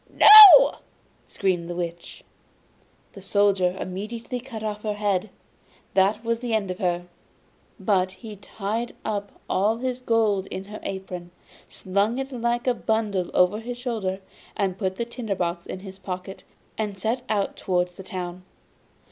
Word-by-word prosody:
'No!' 425 +3 +10 0.5
screamed 180 -4 -1
the 175 - -4
Witch. 170 -1 -6 0.9
The 195 - -11
Soldier 195 -2 +1
immediately 225 +6 -5
cut 235 -3 -8
off 210 -1 -4
her 210 -1 -3
head. 205 -1 -1 0.6
That 200 +3 +2
was 230 0 -1
the 240 -2 -2
end 200 -4 -1
of 185 - -7
her! 175 -2 -1 0.7
But 185 -2 +1
he 215 +2 -10
tied 215 +4 -5
up 205 -2 -4
all 210 +4 +1
his 255 +1 -3
gold 220 -5 +1
in 190 - -6
her 210 +2 -9
apron, 185 -2 -6 0.4
slung 200 +5 -1
it 270 +1 -4
like 240 -1 -1
a 250 - +3
bundle 215 -6 -1
over 180 +4 +3
his 240 +2 -6
shoulder, 215 -6 -3 0.6
put 190 -3 -2
the 235 - -3
tinder 235 -4 -4
box 170 -1 -3
in 185 - -7
his 190 -1 -11
pocket, 185 0 -7 0.3
and 210 -2 -3
set 225 +6 -2
out 205 -2 -1
towards 180 -1 -1
the 190 - -11
town. 180 -1 -6
205 Hz, 150 wpm, -24 LUFS, 185-230 Hz, 0.9 s, No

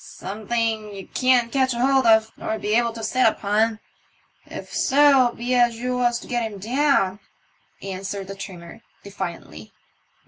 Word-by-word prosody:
" - - -17
Something 220 +1 -3
ye 195 - -8
can't 250 +1 +1
catch 260 -2 +1
hold 260 +1 +2
of, 220 0 +4
nor'd 220 - -5
be 210 - 0
able 235 +1 +2
to 225 -1 -8
sit 255 +3 +2
upon, 215 +1 0 0.7
if - - -9
so 275 -3 +4
be 245 +2 -3
as 240 -2 +3
you 250 +1 -2
was 240 -1 +1
to - - -12
get 240 -1 -1
him 205 - -9
down," 225 -3 +1 0.6
answered 195 +1 -5
the 195 - -7
trimmer, 180 -4 -10 0.2
defiantly. 170 - -7
225 Hz, 160 wpm, -23 LUFS, 200-250 Hz, 0.7 s, of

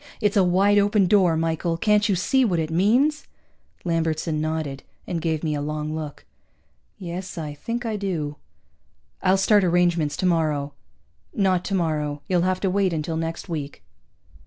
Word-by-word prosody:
It's 210 -2 +1
a 195 - +5
wide 195 +3 +4
open 205 0 +3
door, 180 -4 +4
Michael! 165 +1 -1
Can't 210 +3 +2
you 195 - +3
see 260 +9 +2
what 190 -8 +1
it 160 -1 -2
means?" 245 - +2 0.6
Lambertson 160 -2 -1
nodded, 155 -3 -3 0.2
and 170 -3 -3
gave 160 -1 -1
me 155 -2 0
a 145 - -2
long 150 +1 -3
look. 155 -2 -6 0.7
"Yes, 180 +1 -6
I 150 -3 -4
think 235 +11 -4
I 220 -2 -2
do." 160 -7 -3 0.8
"I'll 190 0 +3
start 205 +1 +4
arrangements 175 -4 +2
tomorrow." 155 -5 0 0.6
"Not 190 -5 +2
tomorrow. 155 -7 -1
You'll 180 -2 +2
have 185 +1 0
to 195 - +1
wait 190 -2 +1
until 160 +1 -2
next 165 +3 -4
week." 150 -5 -5
170 Hz, 160 wpm, -24 LUFS, 155-195 Hz, 0.8 s, a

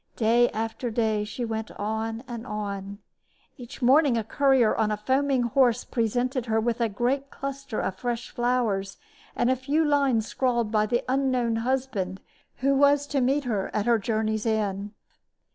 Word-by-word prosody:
Day 235 +2 +3
after 225 +2 -3
day 220 -2 0
she 235 +3 -4
went 220 -1 -4
on 220 +2 -3
and 240 0 -7
on. 200 -1 -5 0.6
Each 250 +1 -10
morning 270 0 +5
a 225 - 0
courier 265 -1 +3
on 220 -1 +1
a 210 - -1
foaming 260 +3 +1
horse 240 0 +2
presented 245 +2 -1
her 220 0 +2
with 235 +1 -1
a 230 - +2
great 255 +7 -1
cluster 275 -4 -5
of 185 - -2
fresh 240 +2 -3
flowers 235 -6 0 0.4
and 240 - +2
a - - +3
few 285 +5 0
lines 275 -6 +2
scrawled 240 -4 0
by 215 -1 +2
the 240 +2 0
unknown 255 -3 +1
husband 225 -6 -2 0.4
who 275 +1 +3
was 285 +1 +4
to 280 -1 -1
meet 275 +3 +2
her 215 -6 -2
at 210 - 0
her 235 -1 +3
journey's 220 0 -1
end. 205 -2 -1
235 Hz, 165 wpm, -26 LUFS, 220-260 Hz, 0.6 s, morning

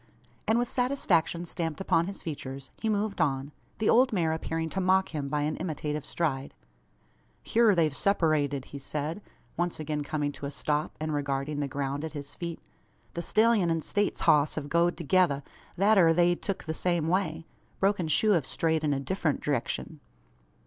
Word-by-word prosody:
and, 220 +2 +3
with 240 0 +1
satisfaction 195 - +1
stamped 165 -2 -3
upon 170 -3 +2
his 195 - -6
features, 135 -3 -6
he 225 - 0
moved 210 -1 0
on, 135 0 0 0.3
the 220 - 0
old 255 +2 +5
mare 165 -6 +1
appearing 160 0 -2
to 190 +4 -2
mock 190 +1 +3
him 145 -3 -4
by 150 +1 0
an 150 +1 -1
imitative 150 -3 -3
stride! 140 -5 -2 0.9
"Hyur 225 -3 +4
they've 155 -4 +2
seppurated," 155 -8 +1
he 140 - -9
said, 150 +7 -4 0.4
once 175 -1 -1
again 150 -1 -2
coming 145 0 -2
to 140 - -6
a - - -4
stop, 150 +1 -1
and 155 0 -2
regarding 140 0 -2
the 145 - -1
ground 140 +1 -3
at 160 -2 -5
his 145 -1 -6
feet. 170 -2 -5 0.5
"The 170 - -3
stellyun 215 -1 +3
an 165 -1 0
States 205 0 0
hoss 150 0 +4
hev 145 -2 -4
goed 170 +2 +2
thegither 165 -3 +2 0.3
thet 200 +2 +5
air 165 -2 +5
they've 175 0 +3
tuk 195 - -3
the 160 - -3
same 170 -1 0
way. 165 -3 0 0.3
Broken 195 -3 +1
shoe 210 +8 +4
hev 170 -7 +3
strayed 160 +3 0
in 150 -1 +2
a - - -1
diffrent 160 0 -1
direkshun." 145 +3 -2
160 Hz, 180 wpm, -28 LUFS, 145-185 Hz, 0.9 s, old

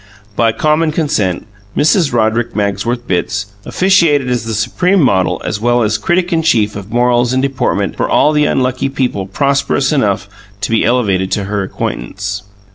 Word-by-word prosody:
By 115 0 +3
common 155 +5 +1
consent, 145 - -1 0.3
Mrs. 160 +1 +3
Roderick 115 0 0
Magsworth 105 +4 -1
Bitts 105 +1 -2
officiated 165 -9 +2
as 120 -2 -1
the 115 -1 -3
supreme 180 - +1
model 95 - +2
as 105 - -3
well 120 0 +2
as 110 0 0
critic 175 - 0
in 165 - +2
chief 110 -10 +1
of 100 +1 -8
morals 120 +1 +2
and 130 +1 +1
deportment 135 -2 -1
for - - -1
all 150 - +4
the 150 -1 +2
unlucky 130 0 0
people 125 -8 -2
prosperous 140 +4 0
enough 105 -9 0 0.3
to 105 - -2
be 115 - +2
elevated 100 -7 +1
to 100 - -1
her 100 +1 -2
acquaintance. 95 +3 -4
120 Hz, 165 wpm, -14 LUFS, 105-140 Hz, 0.3 s, all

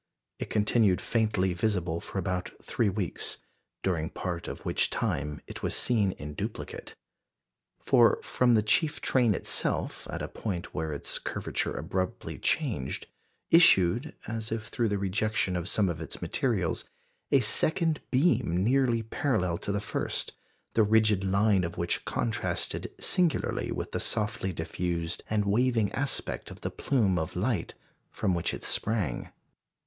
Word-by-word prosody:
It - - -4
continued 105 -2 +3
faintly 105 -5 +1
visible 90 -3 0
for - - -7
about 90 -1 -1
three 110 - 0
weeks, 95 -3 -2 0.5
during 85 -4 0
part 85 -2 -4
of - - -7
which - - +2
time 75 +1 -2
it - - -8
was - - -1
seen 105 -6 +2
in 75 0 -7
duplicate. - - -6 0.8
For - - +5
from 125 -2 +3
the 105 - +3
chief 150 +8 +2
train 120 -6 +3
itself, - - -1
at - - -4
a - - -2
point 90 -6 -4
where 80 -1 -2
its 75 - -2
curvature - - -2
abruptly 95 -1 -3
changed, 65 0 -1 0.5
issued, 120 - +5
as 110 0 -3
if 110 0 -3
through 115 -2 0
the 100 - 0
rejection 100 0 0
of 90 +1 -2
some 105 -2 +2
of 85 -2 -3
its 80 - -5
materials, 105 -10 0 0.5
a 140 - +5
second 155 - +2
beam 125 - +2
nearly 120 -1 +3
parallel 105 -7 0
to - - -3
the 100 - 0
first, 100 - -2 0.4
the 115 - +4
rigid 110 -2 +4
line 100 0 +3
of 85 0 -4
which 85 0 -1
contrasted 115 -2 -2
singularly 175 -4 +1
with - - -4
the - - -1
softly 105 -3 -1
diffused 85 0 -2
and 105 -1 +1
waving 115 0 +2
aspect 135 +1 -2
of - - -11
the - - -3
plume 100 -9 +1
of 80 - -4
light 105 +5 -1 0.3
from 95 - 0
which 85 -1 0
it - - -6
sprang. 100 - -1
100 Hz, 150 wpm, -29 LUFS, 90-115 Hz, 0.8 s, For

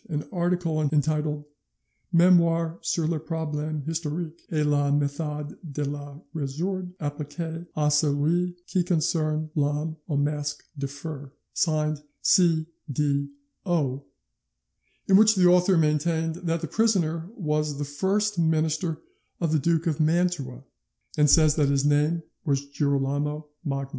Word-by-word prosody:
472) - - -35
an 150 +4 -5
article 175 -3 +1
entitled 150 0 0 0.7
'Memoires 170 -1 +4
sur 165 - 0
les 160 0 0
Problemes 155 -2 -3
historiques, 165 +1 -3
et 155 -2 +1
la 145 -1 +2
methode 145 +1 -1
de 150 -3 -4
les 145 0 -5
resoudre 175 +5 -3
appliquee 160 +3 -5
a 150 -1 +2
celui 155 +4 +2
qui 185 -1 0
concerne 155 -2 0
l'Homme 150 +2 0
au 145 - 0
Masque 145 0 -1
de 140 -1 -3
Fer', 145 0 -7 0.2
signed 155 -2 0 0.2
C. 165 -3 +4 0.3
D. 140 0 0 0.4
O., 145 -7 0 1.0
in 190 - +7
which 215 +1 +6
the 185 -2 +4
author 180 +1 +5
maintained 160 +1 +1
that 165 0 0
the 165 - -3
prisoner 170 -6 +1
was 150 - -1
the 145 - -2
first 195 +7 0
minister 160 0 +1 0.4
of 165 -3 0
the 155 - +3
Duke 165 +2 +1
of 160 -3 0
Mantua, 155 -5 0 0.5
and 150 -1 +4
says 155 0 +5
his 140 -2 +2
name 150 +3 +2 0.2
was 140 -3 0
Girolamo 145 +1 -1
Magni. 140 -3 -3
155 Hz, 135 wpm, -26 LUFS, 145-170 Hz, 1.0 s, in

